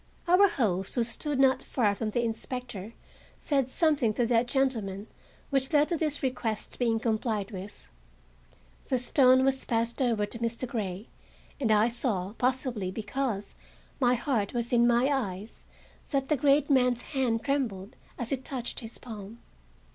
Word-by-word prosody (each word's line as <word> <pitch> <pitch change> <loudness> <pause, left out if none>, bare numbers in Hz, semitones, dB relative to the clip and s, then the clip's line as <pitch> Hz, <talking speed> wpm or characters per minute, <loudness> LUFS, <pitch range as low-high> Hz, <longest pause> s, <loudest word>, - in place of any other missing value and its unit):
Our 365 +4 +6
host, 195 - -1
who 240 - +2
stood 280 +5 -2
not 265 -1 +4
far 215 -6 +1
from 215 +2 -3
the 240 +3 0
inspector, 230 -2 -5 0.4
said 275 -4 0
something 285 -8 +2
to 240 - +2
that 235 +1 +2
gentleman 225 -7 0 0.5
which 270 0 +1
led 300 -1 +4
to 345 - +1
this 300 -3 -2
request 245 -5 -3
being 230 -2 +2
complied 220 -2 -1
with. 195 - -9 1.0
The 260 - +2
stone 260 +1 +4
was 270 0 +1
passed 230 +2 -1
over 230 -5 +2
to 230 +3 -10
Mr. 235 +2 -2
Grey, 205 -3 -4 0.5
and 250 -5 0
I 215 +1 +5
saw, 220 -6 -1
possibly 250 -6 0
because 215 +1 -3 0.5
my 250 -2 +4
heart 235 -4 -1
was 240 +1 -2
in 240 0 +5
my 240 +1 +4
eyes, 215 -7 -3 0.4
that 275 -2 -1
the 305 - +4
great 285 +1 +3
man's 250 -3 +3
hand 240 -4 0
trembled 230 -9 -2 0.2
as 240 -2 -4
it 265 -1 -2
touched 255 -3 -3
his 225 -2 -5
palm. 215 -2 -9
240 Hz, 155 wpm, -28 LUFS, 220-265 Hz, 1.0 s, Our